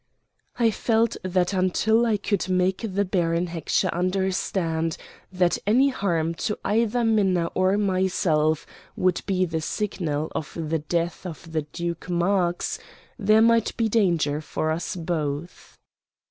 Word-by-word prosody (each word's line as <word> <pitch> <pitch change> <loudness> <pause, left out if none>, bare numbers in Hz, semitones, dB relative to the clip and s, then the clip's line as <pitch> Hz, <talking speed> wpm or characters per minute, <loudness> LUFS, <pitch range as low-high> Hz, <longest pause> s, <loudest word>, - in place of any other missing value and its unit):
I 230 -2 +3
felt 225 +1 +1
that 185 0 0
until 220 +5 +2
I 215 -2 +2
could 200 -2 -1
make 185 +1 +1
the 200 +2 +1
Baron 170 -2 0
Heckscher 170 +2 0
understand 180 -3 -1 0.3
that 180 -2 +1
any 255 +6 +5
harm 170 -9 -1
to 210 - -1
either 230 +3 +1
Minna 190 -6 +2
or 185 +2 +2
myself 185 -6 +1 0.3
would 185 -1 +1
be 185 -2 +2
the 160 -2 -3
signal 160 -5 -2
for 160 +2 -8
the 160 0 -1
death 170 +2 -2
of 165 -1 -9
the 160 -1 0
Duke 170 0 -4
Marx 175 0 0 0.4
there 215 +1 +5
might 230 -1 +3
be 230 - +2
danger 170 -9 +1
for 155 +1 -2
us 165 +3 -3
both. 160 -2 -4
185 Hz, 135 wpm, -24 LUFS, 165-205 Hz, 0.4 s, any